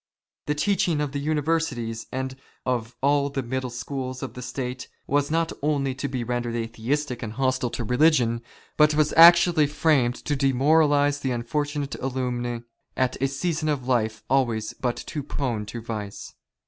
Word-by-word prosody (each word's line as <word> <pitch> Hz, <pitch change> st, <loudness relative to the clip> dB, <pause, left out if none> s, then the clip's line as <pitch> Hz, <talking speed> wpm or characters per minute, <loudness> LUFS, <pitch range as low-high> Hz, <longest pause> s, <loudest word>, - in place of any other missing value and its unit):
The 150 Hz, -, +1 dB
teaching 175 Hz, 0 st, +1 dB
of 150 Hz, -2 st, -1 dB
the 140 Hz, -, -3 dB
Universities 145 Hz, -6 st, -1 dB
and 130 Hz, 0 st, -3 dB, 0.3 s
of 120 Hz, -2 st, -2 dB
all 140 Hz, 0 st, +3 dB
the 135 Hz, -1 st, -3 dB
middle 130 Hz, +1 st, -3 dB
schools 130 Hz, +1 st, -5 dB
of 135 Hz, -, -5 dB
the 125 Hz, -, -8 dB
State, 125 Hz, 0 st, -5 dB, 0.2 s
was 145 Hz, +1 st, +1 dB
not 165 Hz, +1 st, +1 dB
only 140 Hz, -2 st, 0 dB
to 130 Hz, +2 st, -3 dB
be 130 Hz, -3 st, -3 dB
rendered 120 Hz, 0 st, -2 dB
Atheistic 120 Hz, +4 st, -2 dB
and 110 Hz, -2 st, -5 dB
hostile 130 Hz, -1 st, 0 dB
to 120 Hz, -, -4 dB
religion, 125 Hz, -2 st, +3 dB, 0.4 s
but 150 Hz, 0 st, +5 dB
was 150 Hz, -1 st, +2 dB
actually 170 Hz, -2 st, +7 dB
framed 145 Hz, -5 st, +2 dB
to 145 Hz, -, 0 dB
demoralize 145 Hz, +2 st, +3 dB
the 135 Hz, -, -2 dB
unfortunate 145 Hz, +4 st, -2 dB
alumni 125 Hz, -2 st, -2 dB, 0.4 s
at 130 Hz, 0 st, 0 dB
a 135 Hz, -, +3 dB
season 155 Hz, +3 st, -1 dB
of 135 Hz, -4 st, -2 dB
life 110 Hz, -3 st, 0 dB
always 120 Hz, -5 st, +1 dB
but 125 Hz, -2 st, -2 dB
too 150 Hz, -, -5 dB
prone 125 Hz, -7 st, -3 dB
to 115 Hz, +2 st, -6 dB
vice. 105 Hz, -3 st, -6 dB
135 Hz, 160 wpm, -25 LUFS, 120-150 Hz, 0.4 s, actually